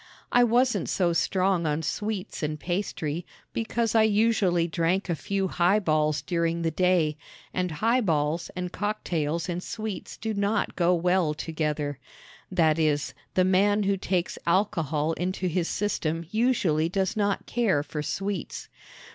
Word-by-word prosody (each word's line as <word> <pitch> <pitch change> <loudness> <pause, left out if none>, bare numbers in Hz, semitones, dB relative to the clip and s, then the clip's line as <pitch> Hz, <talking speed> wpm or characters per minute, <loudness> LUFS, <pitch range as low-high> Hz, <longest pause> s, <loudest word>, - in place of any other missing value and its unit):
I 245 - +5
wasn't 240 -4 +2
so 175 -3 +1
strong 185 0 +1
on 150 +2 -1
sweets 210 +4 -3
and 150 0 -2
pastry, 175 -3 -2 0.3
because 230 0 -1
I 225 - +5
usually 210 -5 +3
drank 175 +3 0
a 170 - +1
few 195 +6 -1
highballs 155 -6 +2
during 170 +2 0
the 165 - +1
day, 170 -3 +2 0.4
and 180 0 0
highballs 165 -5 +1
and 180 -1 -3
cocktails 170 -7 -2
and 175 0 -3
sweets 215 0 -6
do 220 0 -3
not 205 +1 0
go 180 0 +3
well 175 -2 +1
together 150 -3 -2 0.5
that 165 -3 +3
is, 150 -2 +1 0.2
the 185 - +4
man 205 +3 +3
who 200 0 +2
takes 185 -2 -2
alcohol 165 -5 +1
into 185 +2 -2
his 175 0 0
system 165 -5 -1
usually 200 -9 +2
does 190 +1 0
not 205 -2 0
care 215 -12 +1
for 150 0 -5
sweets. 195 +4 -4
180 Hz, 140 wpm, -26 LUFS, 160-205 Hz, 0.5 s, I